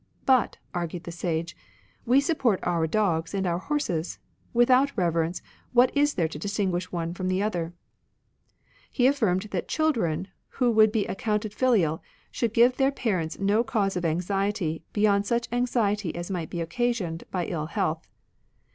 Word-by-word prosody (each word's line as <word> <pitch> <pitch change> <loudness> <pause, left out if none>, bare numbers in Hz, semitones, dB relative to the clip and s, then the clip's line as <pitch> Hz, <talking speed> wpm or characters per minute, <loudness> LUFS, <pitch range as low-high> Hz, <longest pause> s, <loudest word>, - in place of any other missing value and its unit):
" - - -37
But," 260 -3 +3 0.2
argued 175 0 -3
the 170 - -7
Sage, 170 -1 -3 0.3
" 95 - -35
we 255 +3 +6
support, 265 - +1
our 170 -2 +1
dogs 165 -2 0
and 195 -1 0
our 175 -1 0
horses; 185 - -2 0.3
without 255 +3 +3
reverence, 170 -1 0 0.3
what 245 +2 +4
is 290 +1 +3
there 165 -3 +1
to 155 -2 -8
distinguish 190 -2 -2
one 170 -1 -3
from 185 +1 -4
the 185 +2 +1
other? 175 -5 -2 0.6
" - - -36
He 250 - +2
affirmed 220 -9 +2
that - - -2
children 200 - 0 0.3
who 250 -2 +3
would 215 -1 +5
be 215 -2 0
a>ccounted 210 +2 -2
filial 205 -12 +2 0.3
should 235 -3 -1
give 245 +2 +5
their 270 0 +3
parents 185 - -2
no 205 +4 +2
cause 200 -6 0
of 180 - -2
anxiety 180 0 -1
beyond 205 -1 +2
such 235 +1 0
anxiety 220 -6 0
as 175 +2 -5
might 170 -4 -3
be 175 - -5
occa 240 +9 0
sioned 175 -9 -3
by 180 -2 -2
ill 155 -3 -3
health. 165 -4 -2
195 Hz, 170 wpm, -26 LUFS, 170-235 Hz, 0.6 s, we